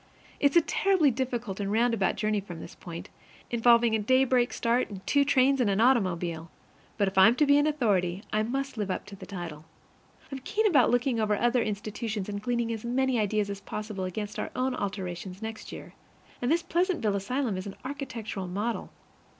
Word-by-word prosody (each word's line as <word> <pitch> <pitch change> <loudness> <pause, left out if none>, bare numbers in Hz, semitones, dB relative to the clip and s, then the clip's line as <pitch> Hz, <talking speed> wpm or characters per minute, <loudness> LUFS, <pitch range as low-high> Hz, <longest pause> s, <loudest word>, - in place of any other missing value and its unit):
It's 285 +1 +3
a 340 - +8
terribly 365 -4 +2
difficult 240 -5 -3
and 200 0 -2
roundabout 230 -3 +2
journey 210 0 0
from 175 -4 -9
this 165 - -9
point, 170 -1 -9 0.4
involving 235 -1 +4
a 220 - +2
daybreak 255 +2 +3
start 235 +2 0
and 195 -2 -9
two 285 0 +3
trains 270 -1 +3
and 225 - +2
an 195 +1 +1
automobile. 180 -9 +1 0.5
But 200 -2 +2
if 190 0 +1
I'm 225 +5 +7
to 300 - +3
be 285 0 +5
an 290 - +2
authority, 200 - +1
I 215 - +2
must 270 +3 -3
live 205 -2 -2
up 185 - -3
to 200 - -10
the - - -11
title. 170 -6 -7 0.7
I'm 270 - -4
keen 430 +11 -1
about 295 - +5
looking 245 -1 +1
over 210 -1 +2
other 240 +2 +2
institutions 210 0 -3
and 205 -1 -4
gleaning 235 0 -1
as 220 - -6
many 255 +1 +1
ideas 210 -1 0
as 200 0 -6
possible 210 -3 -5
against 205 +3 -5
our - - -3
own 255 +1 0
alterations 190 -3 -4
next 220 0 -6
year. - - -9 0.5
And 245 +3 0
this 335 +1 +2
Pleasantville 345 - 0
asylum 225 +3 -1
is 185 +2 -5
an 195 - -7
architectural 235 -8 -5
model. 210 +6 -3
225 Hz, 190 wpm, -28 LUFS, 200-255 Hz, 0.7 s, a